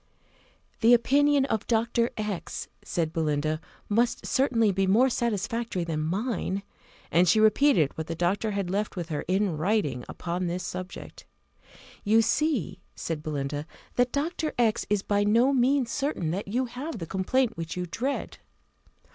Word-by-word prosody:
"The 235 Hz, +1 st, +7 dB
opinion 280 Hz, +3 st, +3 dB
of 220 Hz, -6 st, -2 dB
Dr. 235 Hz, +1 st, +1 dB
X 210 Hz, -4 st, -4 dB
," -, -, -41 dB
said 165 Hz, -2 st, -2 dB
Belinda, 155 Hz, -1 st, 0 dB, 0.3 s
"must 230 Hz, +3 st, +1 dB
certainly 230 Hz, -6 st, +2 dB
be 195 Hz, 0 st, +1 dB
more 240 Hz, +7 st, +4 dB
satisfactory 230 Hz, -3 st, -1 dB
than 165 Hz, -2 st, -2 dB
mine;" 195 Hz, +3 st, -2 dB, 0.5 s
and 175 Hz, +2 st, +4 dB
she 215 Hz, -, +5 dB
repeated 215 Hz, -, +4 dB
what 160 Hz, 0 st, -5 dB
the 165 Hz, -, -3 dB
doctor 185 Hz, +6 st, 0 dB
had 200 Hz, -3 st, -2 dB
left 205 Hz, +2 st, -1 dB
with 175 Hz, -2 st, -4 dB
her 150 Hz, -2 st, -2 dB
in 190 Hz, -2 st, +1 dB
writing 155 Hz, -, 0 dB
upon 175 Hz, +1 st, -3 dB
this 175 Hz, +1 st, -3 dB
subject. 185 Hz, +1 st, -7 dB, 0.8 s
"You 225 Hz, +2 st, +4 dB
see," 300 Hz, -, 0 dB
said 160 Hz, -2 st, -4 dB
Belinda, 145 Hz, 0 st, -3 dB, 0.3 s
"that 245 Hz, 0 st, +2 dB
Dr. 310 Hz, +2 st, -2 dB
X 230 Hz, -3 st, +1 dB
is 205 Hz, -1 st, +1 dB
by 205 Hz, 0 st, +1 dB
no 230 Hz, +6 st, +4 dB
means 260 Hz, -1 st, +2 dB
certain 275 Hz, -, -1 dB
that 195 Hz, +4 st, -3 dB
you 245 Hz, +6 st, 0 dB
have 255 Hz, +6 st, -6 dB
the 170 Hz, -, -5 dB
complaint 220 Hz, +8 st, 0 dB
which 165 Hz, +1 st, -5 dB
you 180 Hz, -, -2 dB
dread." 255 Hz, +11 st, -3 dB
205 Hz, 155 wpm, -27 LUFS, 175-240 Hz, 0.8 s, The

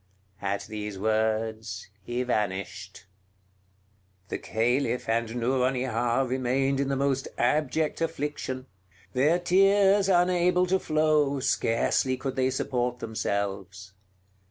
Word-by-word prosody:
At 100 Hz, 0 st, -2 dB
these 105 Hz, -2 st, -6 dB
words 110 Hz, -1 st, -1 dB
he 120 Hz, +4 st, -2 dB
vanished. 100 Hz, -3 st, -3 dB, 1.2 s
The -, -, -3 dB
Caliph 120 Hz, +2 st, 0 dB
and 115 Hz, +1 st, 0 dB
Nouronihar 125 Hz, 0 st, 0 dB
remained 130 Hz, +2 st, 0 dB
in 140 Hz, -, 0 dB
the 135 Hz, -, 0 dB
most 135 Hz, 0 st, 0 dB
abject 150 Hz, +5 st, 0 dB
affliction; 145 Hz, -5 st, -3 dB, 0.5 s
their 150 Hz, +7 st, +3 dB
tears 195 Hz, +2 st, +4 dB
unable 180 Hz, 0 st, +3 dB
to 190 Hz, +1 st, +1 dB
flow, 155 Hz, -3 st, +2 dB
scarcely 130 Hz, 0 st, +1 dB
could 135 Hz, 0 st, -4 dB
they 130 Hz, 0 st, +2 dB
support 125 Hz, -3 st, -1 dB
themselves. 100 Hz, -4 st, -4 dB
130 Hz, 105 wpm, -27 LUFS, 110-145 Hz, 1.2 s, tears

